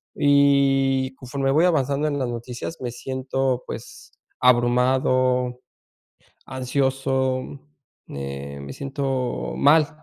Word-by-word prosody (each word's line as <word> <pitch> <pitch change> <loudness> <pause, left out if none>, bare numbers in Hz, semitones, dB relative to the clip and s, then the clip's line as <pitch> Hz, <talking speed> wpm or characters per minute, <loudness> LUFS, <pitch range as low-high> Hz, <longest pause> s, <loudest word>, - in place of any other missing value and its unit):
y 135 -2 +3
conforme 135 +1 -2
voy 160 +5 +4
avanzando 145 -3 +1
en 145 -1 -1
las 130 - -1
noticias, 120 +6 -6
me 125 - -3
siento, 130 0 -2
pues, - - -9 0.3
abrumado, 125 0 +2 0.9
ansioso, 130 0 0 0.6
me 70 0 -6
me 70 0 -8
siento 135 - -3
mal. 150 +1 +5
130 Hz, 95 wpm, -23 LUFS, 125-140 Hz, 0.9 s, mal